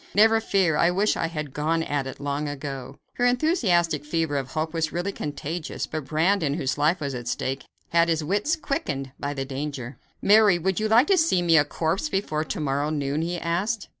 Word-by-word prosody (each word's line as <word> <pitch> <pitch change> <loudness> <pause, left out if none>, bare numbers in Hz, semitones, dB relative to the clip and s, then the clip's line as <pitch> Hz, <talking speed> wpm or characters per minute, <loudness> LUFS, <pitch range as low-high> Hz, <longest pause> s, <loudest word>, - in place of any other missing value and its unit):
Never 225 +2 +5
fear! 190 -8 +2
I 170 - +4
wish 195 +4 +2
I 165 - -1
had 150 -4 -5
gone 160 +2 0
at 145 -3 -2
it - - -8
long 145 +1 -2
ago." 140 -2 -6 0.2
Her 245 - +2
enthusiastic 195 - +2
fever 160 -1 -1
of 135 -2 -2
hope 155 +1 -2
was 160 -1 -1
really 175 +3 -2
contagious, 155 0 -4
but 155 -3 -5
Brandon, 160 0 +1
whose 135 -5 -1
life 155 +5 +2
was 140 -3 -3
at 120 -1 -6
stake, 135 +3 -2 0.2
had 170 0 +3
his 160 -2 +1
wits 205 - +1
quickened 140 - -3
by 145 0 -3
the 135 -1 -3
danger. 135 -2 -5 0.2
"Mary, 205 -3 +5
would 190 +3 -1
you 215 - 0
like 230 +5 +5
to 380 +2 +3
see 315 - +2
me 165 -1 +4
a 150 - +6
corpse 165 - -1
before 155 - -1
to 185 - -4
morrow 145 0 0
noon?" 145 0 -1
he 175 +2 -2
asked. 190 +7 -2
160 Hz, 205 wpm, -25 LUFS, 145-190 Hz, 0.2 s, a